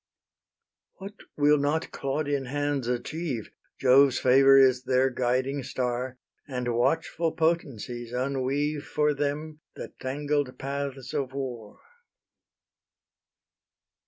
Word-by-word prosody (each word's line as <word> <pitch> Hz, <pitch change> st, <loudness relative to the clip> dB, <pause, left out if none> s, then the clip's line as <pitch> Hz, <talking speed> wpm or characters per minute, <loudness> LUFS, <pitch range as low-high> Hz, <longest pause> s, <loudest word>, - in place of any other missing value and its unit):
What 195 Hz, +2 st, -9 dB, 0.2 s
will 145 Hz, 0 st, +4 dB
not 145 Hz, +3 st, -1 dB
Claudian 140 Hz, 0 st, -2 dB
hands 145 Hz, -1 st, -2 dB
achieve? 125 Hz, 0 st, -3 dB, 0.3 s
Jove's 135 Hz, 0 st, +5 dB
favour 135 Hz, +1 st, +6 dB
is 130 Hz, -2 st, +5 dB
their 130 Hz, +1 st, +2 dB
guiding 130 Hz, +3 st, 0 dB
star, 125 Hz, 0 st, -3 dB, 0.3 s
And 125 Hz, -3 st, -2 dB
watchful 160 Hz, +6 st, 0 dB
potencies 125 Hz, -8 st, -2 dB
unweave 140 Hz, +3 st, -1 dB
For 150 Hz, 0 st, +1 dB
them 150 Hz, +2 st, -3 dB, 0.2 s
the -, -, -8 dB
tangled 145 Hz, 0 st, -2 dB
paths 135 Hz, -1 st, -5 dB
of 135 Hz, -2 st, -2 dB
war. 125 Hz, -6 st, -6 dB
135 Hz, 100 wpm, -27 LUFS, 125-145 Hz, 0.3 s, favour